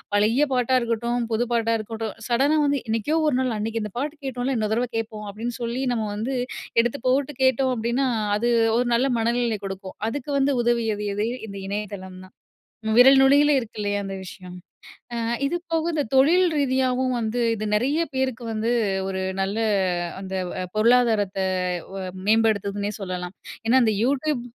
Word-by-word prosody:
பழைய 225 +8 +3
பாட்டா 250 +1 +2
இருக்கட்டும், 235 +1 -1
புது 235 +2 +1
பாட்டா 230 -1 +1
இருக்கட்டும் 220 0 -5
சடனா 275 +6 +3
வந்து 285 -1 +1
"என்னைக்கோ 230 +9 0
ஒரு 270 -4 +2
நாள் 255 -3 -1
அன்னக்கு 225 +1 -2
இந்த 210 -2 -6
பாட்டு 295 +3 -3
கேட்டோம்ல! 260 0 -2
இன்னொரு 215 0 0
தரவை 245 +1 -1
கேட்போம்." 220 -1 -4
அப்டின்னு 230 +3 -5
சொல்லி 235 +3 -2
நம்ம 220 -2 -1
வந்து 245 +5 -2 0.5
எடுத்து 240 +4 -2
போட்டு 275 +2 +1
கேட்டோம் 260 0 +3
அப்டின்னா, 235 +4 0 0.3
அது 240 +2 0 0.3
ஒரு 245 0 +1
நல்ல 265 +3 +2
மனநிலை 235 -1 0
கொடுக்கும். 190 0 -8
அதுக்கு 285 +3 -5
வந்து 275 +1 +2
உதவியது 225 -3 0
எது? 210 +2 0 0.2
இந்த 200 -1 -8
இணையதளம் 200 -2 -5
தான். 185 - -20 0.6
விரல் 265 +2 +8
நுனியில 285 +2 +5
இருக்கு 230 -4 -6
இல்லயா, 205 0 -1
அந்த 195 0 -5
விஷயம். 180 -1 -10 0.6
ஆ - - -3 0.3
இது 345 +5 -1
போக 325 0 0
இந்த 295 -3 0
தொழில் 330 +8 +5
ரீதியாவும் 260 -2 +1
வந்து, 230 +2 -1
இது 215 - -4
நிறைய 285 +9 +1
பேருக்கு 260 -2 -1
வந்து 220 +2 -1 0.4
ஒரு 190 0 -3 0.2
நல்ல 195 +3 -1 0.6
அந்த 190 0 -5 0.4
பொருளாதாரத்த 220 -4 +3 0.5
வ - - -5 0.3
மேம்படுத்துதுன்னே 205 -2 +1
சொல்லலாம். 180 -1 -5 0.3
ஏன்னா 260 +3 +5
அந்த 220 -2 +2
YouTube 275 0 0
235 Hz, 160 wpm, -24 LUFS, 210-260 Hz, 0.6 s, விரல்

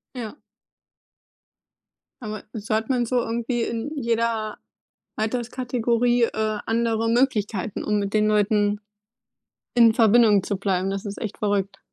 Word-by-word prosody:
Ja. 235 0 -6 1.9
Aber 215 -1 -6
so 215 -1 -5
hat 220 0 -1
man 250 -2 +1
so 250 +2 -1
irgendwie 235 +1 -1
in 235 +7 -3
jeder 230 -2 -1 0.6
Alterskategorie, 240 +1 0
äh, 215 -1 0
andere 225 0 0
Möglichkeiten, 225 -4 0
um 210 -1 +1
mit 200 +1 -3
den 215 0 +3
Leuten 210 -1 +2 0.9
in 235 -2 +6
Verbindung 220 -3 +5
zu 200 - -2
bleiben. 190 -1 -1
Das 195 0 -3
ist 205 -1 -6
echt 215 - -5
verrückt. 200 -1 -1
220 Hz, 125 wpm, -24 LUFS, 210-235 Hz, 1.9 s, in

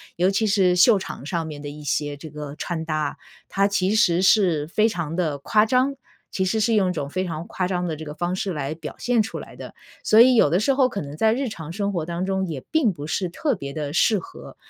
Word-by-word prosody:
尤 180 +3 +2
其 215 +3 +1
是 190 -3 +3
秀 200 +5 +6
场 185 -7 -7
上 165 -1 -2
面 150 -2 -7
的 145 - -6
一 150 +1 -10
些 145 0 -2
这 155 +2 -10
个 150 -1 -7
穿 165 0 -4
搭， 155 -1 -2 0.3
它 195 0 +2
其 200 -1 0
实 180 -5 +3
是 185 -6 +3
非 215 +7 +2
常 165 -5 -4
地 155 -5 0
夸 210 +9 +3
张， 255 +4 +1 0.4
其 190 - -1
实 220 +4 0
是 225 +2 +2
用 195 -3 +3
一 - - 0
种 140 -5 -4
非 185 +5 -2
常 165 -1 -5
夸 185 - -2
张 180 -1 -2
的 160 - -2
这 160 +1 -8
个 150 - -7
方 175 +3 -2
式 190 +1 -2
来 145 -1 -3
表 160 -1 -8
现 245 -2 +1
出 210 - -4
来 - - -11
的， - - -10 0.3
所 220 +1 +6
以 255 +1 +6
有 220 - +5
的 175 +5 +2
时 250 +7 +2
候 265 -1 +3
可 205 -5 -4
能 145 0 -7
在 220 +3 +3
日 260 +1 -2
常 165 -6 -8
生 200 +1 -1
活 170 -4 -2
当 170 +2 -3
中 190 0 -1
也 150 -6 -5
并 280 -11 +2
不 145 -3 -8
是 175 +4 -2
特 275 - -1
别 140 -6 -7
地 150 -1 -4
适 210 +5 +3
合。 - - -12
180 Hz, 280 characters per minute, -23 LUFS, 155-210 Hz, 0.4 s, 秀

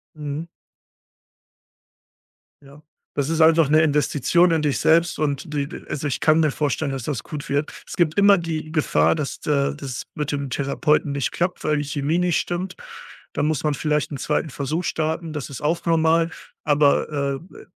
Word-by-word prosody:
Mhm. 150 +2 -5 2.2
Ja, 140 +2 -16 0.3
das 145 0 -1
ist 165 0 +1
einfach 160 -2 +5
'ne 155 +1 +5
Investition 155 +3 +3
in 160 -2 +2
dich 145 -5 0
selbst 170 +1 +3
und 150 +1 -2
die 140 -1 -1 0.2
also, 145 0 -2
ich 135 - -2
kann 155 +1 +4
mir 155 -2 +2
vorstellen, 145 0 -1
dass 135 -2 -4
das 125 -4 -3
gut 150 -1 -7
wird. 145 +2 0 0.2
Es - - -7
gibt 165 -3 +1
immer 200 -1 +7
die 160 -2 -4
Gefahr, 80 - +2
dass 145 - -4
d - - -6
äh, 140 0 +1
das 135 -4 -6
mit 150 -1 -3
dem 140 -2 -3
Therapeuten 145 +2 +1
nicht 140 -2 -1
klappt, 175 +1 -2
weil 150 -1 +1
die 145 - -1
Chemie 145 +4 -1
nicht 180 -1 +2
stimmt. 180 +1 -3 0.6
Da - - -1
muss 150 -1 0
man 150 -1 +1
vielleicht 150 +1 -1
'n 140 - -4
2. 150 +3 -1
Versuch 150 +5 -2
starten, 160 0 -2
das 150 -2 -5
ist 140 - -8
auch 165 +3 0
normal, 165 0 +3 0.3
aber, 145 -1 +2
äh, - - -17
äh, - - -16
150 Hz, 185 wpm, -22 LUFS, 140-160 Hz, 2.2 s, immer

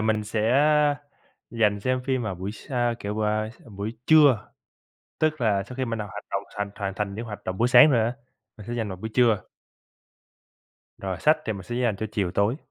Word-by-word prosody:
mình 110 -1 +1
sẽ 110 +1 -2 1.1
dành 105 -3 +1
xem 130 +2 0
phim 130 -2 0
vào 100 -4 -3
buổi 95 +3 -5
sa 120 0 -2
kiểu 105 +1 -3
bà 110 0 0
s 115 - -19 0.2
buổi 105 +3 -3
trưa. 145 -8 +5 0.7
Tức 155 -2 +1
là 105 -4 +2
sau 120 +6 -10
khi 130 - -1
mình 115 -2 -3
đã 105 - -3
hoạt 105 - -8
động - - -1
thành 105 -1 -2
hoàn 100 -2 -3
thành 105 -2 -3
những 115 +3 -5
hoạt 105 -2 -8
động 95 0 -4
buổi 120 +2 +3
sáng 150 +4 +8
rồi 120 -4 +3
á, 115 - 0 0.4
mình 105 - -11
sẽ 120 - -4
dành 115 -3 -2
vào 95 - -5
buổi 110 +5 -6
trưa. 115 -5 +3 1.5
Rồi 95 -1 -3
sách 155 +1 +5
thì 110 - -1
mình 100 -2 -7
sẽ 120 +7 -6
dành 120 -5 0
cho 110 - -3
chiều 100 -5 0
tối. 105 +8 +1
110 Hz, 215 wpm, -25 LUFS, 100-120 Hz, 1.5 s, sáng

